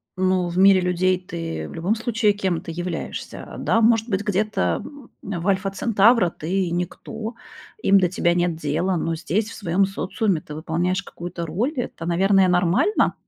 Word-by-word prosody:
Ну, 185 -1 +1
в 175 - -5
мире 190 -1 +6
людей 180 +1 +1
ты 80 - -5
в - - -10
любом 180 +7 0
случае 225 -2 +1
кем-то 185 -4 -2
являешься. 175 0 -5
А, - - -7
да 225 - +1
может 225 0 +3
быть, 195 0 0
где-то 210 +1 0 0.4
в 180 -2 -4
Альфа-Центавра 195 +1 +3
ты 180 +2 -2
никто, 220 +6 -4 0.5
им 195 0 +5
до 180 - +3
тебя 175 -1 +1
нет 175 -1 0
дела, 165 +5 -1
но 165 0 -1
здесь, 200 +7 -1
в - - -9
своём 195 0 +1
социуме, 195 -2 -1
ты 150 - -9
выполняешь 175 +4 -1
какую-то 175 -1 -6
роль, 220 - -1
это, 235 -9 -4
наверное, 190 +2 +3
нормально? 180 - +2
185 Hz, 165 wpm, -22 LUFS, 170-205 Hz, 0.5 s, мире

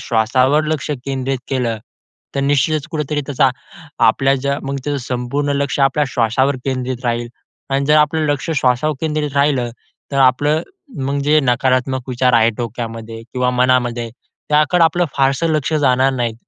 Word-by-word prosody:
श्वासावर 130 +6 +2
लक्ष 155 -1 -2
केंद्रित 135 -1 -2
केलं, 120 -4 -1 0.6
तर - - 0
निश्चितच 145 +2 +1
कुठेतरी 150 -1 -2
त्याचा 135 -2 +3 0.6
आपल्या 135 +4 +3
ज्या 140 +1 -1
मग 140 0 -3
त्याचं 145 -1 -1
संपूर्ण 130 +4 -2
लक्ष 140 0 -1
आपल्या 135 +2 +3
श्वासावर 125 +4 +1
केंद्रित 130 -1 -3
राहील 120 0 -1 0.5
अन् 140 +1 +1
जर 150 +2 +4
आपलं 155 +1 +2
लक्ष 145 +3 -3
श्वासावर 130 +4 +1
केंद्रित 150 -2 -1
राहिलं 140 -4 +2 0.4
तर 140 - -1
आपलं 145 +4 +3 0.4
मग 140 +1 -1
जे 150 +2 +4
नकारात्मक 130 0 0
विचार 125 0 +1
आहे 115 -1 +5
डोक्यामध्ये 115 -1 -6
किंवा 125 0 +1
मनामध्ये, 125 -2 +1 0.4
त्याकडे 155 +4 +3
आपलं 175 +2 +2
फारसं 135 +4 +2
लक्ष 155 0 0
जाणार 135 -3 +3
नाही. 120 -3 -1
135 Hz, 150 wpm, -18 LUFS, 125-145 Hz, 0.6 s, आहे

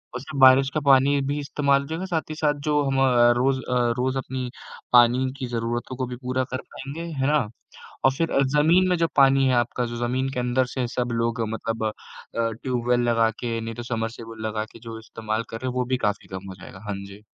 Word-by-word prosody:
उससे 140 +3 -6
बारिश 130 +1 +7
का 155 - +1
पानी 140 +1 +5
भी 145 +1 -1
इस्तेमाल 140 -1 +1
हो 140 - -9
जाएगा, 165 +4 -4
साथ 165 -4 -2
ही 155 - -4
साथ 150 -2 0
जो 150 -1 +3
हम 135 -1 0
अ, 120 -2 +5
रोज़ 130 +1 +2
अ, 125 -1 +1
रोज़ 130 +1 0
अपनी 130 -1 -4 0.4
पानी 120 +1 +6
की 130 - -2
ज़रूरतों 120 +2 -3
को 130 - -1
भी 125 - -6
पूरा 130 +1 -2
कर 130 - -2
पाएँगे, 140 +5 -7 0.2
है 135 - +2
ना? 145 -6 +2 0.6
और 135 - +6
फिर 165 -1 0 0.3
ज़मीन 165 +5 +4
में 180 - +3
जो 165 - +2
पानी 135 -1 +5
है 130 - +3
आपका 120 +1 0
जो 120 0 -5
ज़मीन 130 +2 -1
के - - -2
अंदर 125 +1 +1
से 125 0 -3
सब 125 +1 -2
लोग 115 0 -1
मतलब 115 0 -3
अ, 110 - 0 0.5
ट्यूबवेल 120 +1 0
लगा 115 -1 +3
के, 115 -1 -2
नहीं 115 0 -5
तो 120 - -6
समर्सिबल 115 -1 -5
लगा 110 0 -2
के - - -12
जो 115 -1 -8
इस्तेमाल 110 0 -4
कर 115 - -5
रहे 130 - -5
हैं, - - -4
वो 125 0 0
भी 130 +1 0
काफ़ी 105 - -3
कम 95 +1 -7
हो 95 - -8
जाएगा। 95 - -11
हाँ 105 - -2
जी। 100 +1 -13
125 Hz, 230 wpm, -24 LUFS, 115-135 Hz, 0.6 s, बारिश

